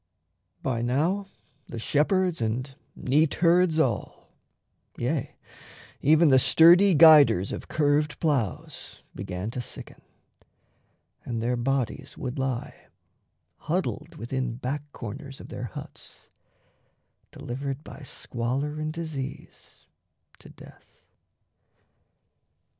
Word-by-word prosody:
By 120 -3 -1
now 160 +12 0 0.4
the 120 - -7
shepherds 170 - +1
and 125 +5 -2 0.2
neatherds 160 +4 +2
all, 125 -10 -1 0.7
Yea, 135 +3 -2 0.7
even 155 +2 +5
the 130 -1 +6
sturdy 175 +7 +6
guiders 150 - +7
of - - -6
curved 150 0 +1
ploughs, 130 - -3
Began 95 +2 -5
to 125 - -4
sicken, - - -10 1.2
and 120 -2 -4
their 120 +2 0
bodies 135 +2 -2
would 130 +1 -5
lie 130 -2 -4 0.7
Huddled - - -3
within 125 +1 -3
back 140 +4 -5
corners 135 +4 -8
of - - -11
their - - -5
huts, - - -11 1.0
Delivered 135 +3 -5
by - - -11
squalor 135 +3 -4
and 155 0 -2
disease 155 -5 -8 0.5
to - - -14
death. - - -17
135 Hz, 95 wpm, -26 LUFS, 120-155 Hz, 1.2 s, guiders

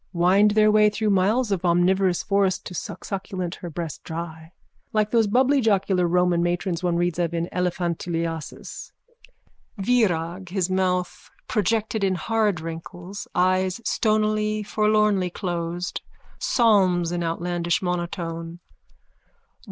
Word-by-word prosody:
Wind 185 +4 +4
their 215 0 +6
way 210 0 +5
through 210 0 -1
miles 205 +5 +2
of 190 -2 -1
omnivorous 180 +1 +2
forest 195 -2 +1
to - - -7
sucksucculent 185 0 -5
her 175 - -5
breast 165 -1 -6
dry. 160 0 -7 0.4
Like 215 -1 +1
those 230 -2 +3
bubblyjocular 210 -7 +2
Roman 180 0 +2
matrons 175 0 -1
one 175 -2 0
reads 175 0 0
of 170 -1 0
in 170 0 -1
Elephantuliasis. 170 -2 -3 0.8
VIRAG: 190 -5 +1
_(His 185 0 -2
mouth 180 -1 -1 0.2
projected 220 +1 0
in 190 -1 +2
hard 215 -2 0
wrinkles, 175 +4 -7
eyes 185 +2 +2
stonily 215 -1 +1
forlornly 210 -3 +2
closed, 175 -1 -4 0.4
psalms 190 -7 +3
in 175 0 -2
outlandish 170 +1 -1
monotone.) 170 -2 -3
185 Hz, 115 wpm, -24 LUFS, 175-210 Hz, 0.8 s, their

